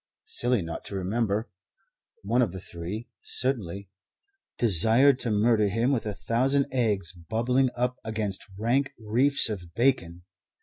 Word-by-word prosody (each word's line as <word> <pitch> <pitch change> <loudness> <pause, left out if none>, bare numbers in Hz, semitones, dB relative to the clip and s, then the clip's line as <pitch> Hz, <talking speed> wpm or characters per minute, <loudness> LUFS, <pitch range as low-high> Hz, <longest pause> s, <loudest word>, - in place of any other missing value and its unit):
silly 120 -5 +1
not 80 0 -6
to 100 - -7
remember 105 +3 -1 0.8
one 115 +5 +1
of 110 -8 0
the 95 - -6
three, 95 +7 -7
certainly 100 -7 -1 0.7
desired 120 - +5
to 120 - -3
murder 105 0 +2
him 115 +6 0
with 115 -5 -1
a 105 - -2
thousand 130 +9 +1
eggs 105 -9 0
bubbling 120 +9 0
up 125 +1 -1
against 110 -3 -3
rank 125 +6 +1
reefs 125 +6 +3
of 90 -6 -7
bacon. 100 -9 0
110 Hz, 135 wpm, -26 LUFS, 100-125 Hz, 0.8 s, desired